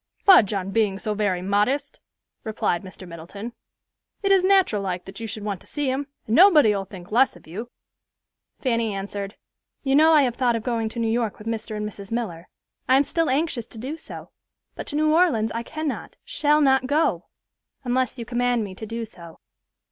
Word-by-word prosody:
"Fudge 365 - +6
on 195 -2 -2
being 210 -3 +1
so 215 +1 -2
very 200 -4 -1
modest," 230 +9 0 0.4
replied 210 -5 -1
Mr. 185 -1 -11
Middleton. 180 +7 -8 0.7
"It 395 - +2
is 385 -2 +5
nateral 375 - +3
like 185 -2 -3
that 195 - -9
you 225 - -5
should 215 0 -6
want 200 -3 -3
to - - -17
see 290 -3 -1
him, 275 +2 -2 0.2
and 220 - 0
nobody'll 295 - +6
think 185 -1 -12
less 255 +4 +3
of - - -17
you." 210 +9 -7 0.9
Fanny 230 -5 0
answered, 200 +1 -5 0.5
"You 270 -1 +2
know 315 +2 +6
I 305 -3 +6
have 250 -3 0
thought 245 -2 +2
of 225 - -3
going 230 -3 -1
to 235 - -7
New 230 - +1
York 225 -1 -1
with 210 - -12
Mr. 220 -1 -3
and 210 0 -3
Mrs. 200 0 -10
Miller. 185 -8 -4 0.4
I 260 - +6
am 275 - +4
still 330 +3 0
anxious 265 -4 -1
to - - -13
do 265 +7 -5
so; 325 - -10 0.4
but - - -7
to - - -3
New 310 +1 +3
Orleans 285 -11 +3
I 230 - -3
cannot, 310 +3 -5
shall 300 0 +2
not 265 -2 +3
go, 300 +4 +1 0.6
unless 255 0 0
you 235 - -5
command 245 -1 0
me 195 -2 -6
to 220 +3 -8
do 230 +1 -4
so." 170 -6 -13
230 Hz, 200 wpm, -24 LUFS, 205-275 Hz, 0.9 s, Fudge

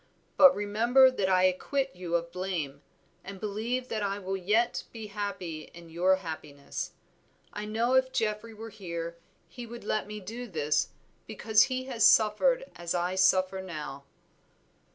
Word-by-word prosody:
But 275 -1 +8
remember 235 +6 +4
that 200 -7 -1
I 185 -1 +4
acquit 265 +8 0
you 175 -1 -3
of 170 0 -1
blame, 170 -7 -3 0.4
and 195 0 -8
believe 225 +5 -2
that 220 - -2
I 200 0 -1
will 195 -1 -3
yet 210 +6 +1
be 225 -2 -7
happy 200 -6 -5
in 170 -1 -12
your 180 +3 +3
happiness. 155 -6 -6 0.6
I 210 - -5
know 225 +4 0
if 260 0 +3
Geoffrey 215 0 -2
were 225 +1 -8
here, 170 -4 -6 0.3
he 240 -2 -9
would 235 +1 -9
let 215 0 -1
me 210 0 -6
do 230 +6 -7
this, 150 -5 0 0.4
because 220 0 +3
he 255 0 -3
has 250 -4 -2
suffered 365 - +5
as 175 0 -3
I 175 +1 0
suffer 190 0 +3
now." 150 -6 -7
200 Hz, 155 wpm, -29 LUFS, 175-225 Hz, 0.6 s, But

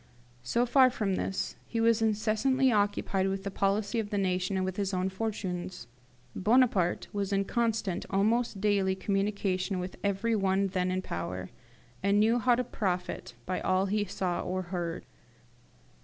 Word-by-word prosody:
So 235 - +1
far 255 +1 +6
from 210 -6 -1
this, 190 +1 -2
he 230 - -2
was 225 0 +3
incessantly 225 +5 +2
occupied 205 -2 +1
with 195 0 -2
the 200 - -3
policy 200 +3 0
of 210 -2 -3
the 205 - -1
nation, 185 0 0
and 185 - 0
with 185 -1 -4
his 195 -2 -1
own 185 +1 0
fortunes. 185 - -4 0.5
Bonaparte 210 -5 +2
was 200 -1 -2
in 195 0 +1
constant, 225 -5 -1
almost 215 +2 +1
daily, 195 -2 +2
communication 195 -1 -1
with 180 0 -5
every 200 +3 +1
one 195 -1 +1
then 185 -1 0
in 185 0 -1
power, 90 - -5 0.5
and 200 +2 +3
knew 225 +3 +4
how 245 +1 +4
to 250 - 0
profit 185 -6 -3
by 185 0 -2
all 185 +1 +2
he 205 +1 0
saw 185 -3 -2
or 185 +1 -2
heard. 170 -2 -3
195 Hz, 160 wpm, -29 LUFS, 185-220 Hz, 0.5 s, far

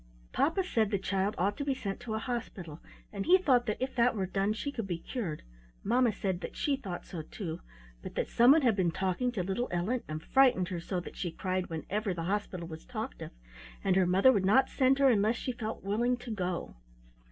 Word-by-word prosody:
Papa 355 +5 +2
said 225 - +1
the 200 - +1
child 195 +2 -1
ought 200 +3 +1
to 285 - -2
be 275 -1 0
sent 195 -6 -4
to 220 -2 -4
a - - 0
hospital, 220 - -5 0.3
and 200 +4 -4
he 365 +2 +8
thought 255 -9 +2
that 210 - -1
if 260 +1 -2
that 245 0 +3
were 195 -3 -1
done 195 +2 0
she 230 +6 -3
could 230 -7 -4
be 175 -3 -2
cured. 170 - -5 0.4
Mamma 240 +2 +3
said 190 -2 -2
that - - -6
she 285 - +1
thought 195 -10 -6
so 170 - -6
too; 165 +1 -6 0.4
but - - -8
that - - 0
someone 275 +6 +6
had 235 -5 +4
been 185 -3 +2
talking 190 +7 -1
to 190 -6 -1
little 195 +7 -1
Ellen, 195 +8 0
and 155 +1 -5
frightened 250 -10 +4
her 175 - -3
so 180 +2 -3
that - - -10
she 175 - -3
cried 185 +2 -2
whenever 190 +5 -3
the 165 - -4
hospital 185 -2 -2
was 160 -1 -9
talked - - -6
of, - - -5 0.5
and 190 -2 +2
her 185 -2 +4
mother 190 +8 +6
would 200 -4 +1
not 255 +8 +4
send 265 0 +3
her 275 -1 +5
unless 220 0 +3
she 255 - -3
felt 225 -2 -5
willing 235 +5 +1
to 245 -1 -8
go. 180 - -3
205 Hz, 225 wpm, -31 LUFS, 185-245 Hz, 0.5 s, he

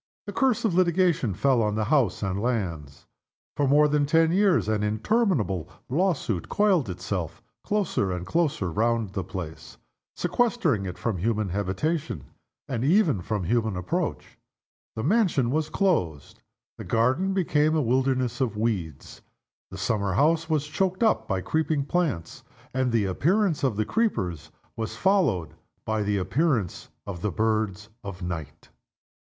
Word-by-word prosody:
The - - -6
curse 245 -4 +1
of 210 - +1
litigation 170 - +2
fell 130 +2 +2
on 105 -1 0
house 110 -2 +1
and 95 0 -2
lands. 90 - -3 0.5
For 145 - +1
more 150 +2 +5
than 145 -1 +1
ten 160 +2 +4
years 190 - +3
an 110 -1 0
interminable 110 - 0 0.2
lawsuit 140 - 0
coiled 190 - +2
itself 90 -2 -4 0.2
closer 195 - 0
and 90 -1 -4
closer 145 - 0
round 115 +1 0
the 95 - -2
place, 80 -10 -8 0.4
sequestering 175 - +1
it 90 - -6
from 115 -5 -2
human 105 +2 0
habitation, 100 - -2 0.4
and 125 -4 -2
even 155 - +3
from 105 +1 -2
human 110 0 0
approach. 90 0 -3 0.6
The 110 - -3
mansion 170 - +2
was 155 +2 0
closed. 90 - -1 0.4
The - - -5
garden 130 +12 +1
became 155 -4 +2
a 155 - +2
wilderness 130 0 0
of 115 -5 -1
weeds. 95 -10 -3 0.5
The 95 - -8
summer 100 -1 0
house 160 - +2
was 155 -2 +1
choked 185 +7 0
up 220 - +2
by 95 -2 -1
creeping 155 - 0
plants; 145 - -2 0.3
and 130 -1 0
the 115 -3 +2
appearance 170 - +1
of 130 -6 +1
the 110 +1 0
creepers 90 - -1 0.3
was 110 -1 -4
followed 150 - +2 0.3
by 110 0 0
the 105 0 0
appearance 110 - 0 0.2
of 90 -4 -6
the 105 - 0
birds 110 0 -1
of 95 -2 -7
night. 85 -5 -6
120 Hz, 145 wpm, -26 LUFS, 100-160 Hz, 0.6 s, more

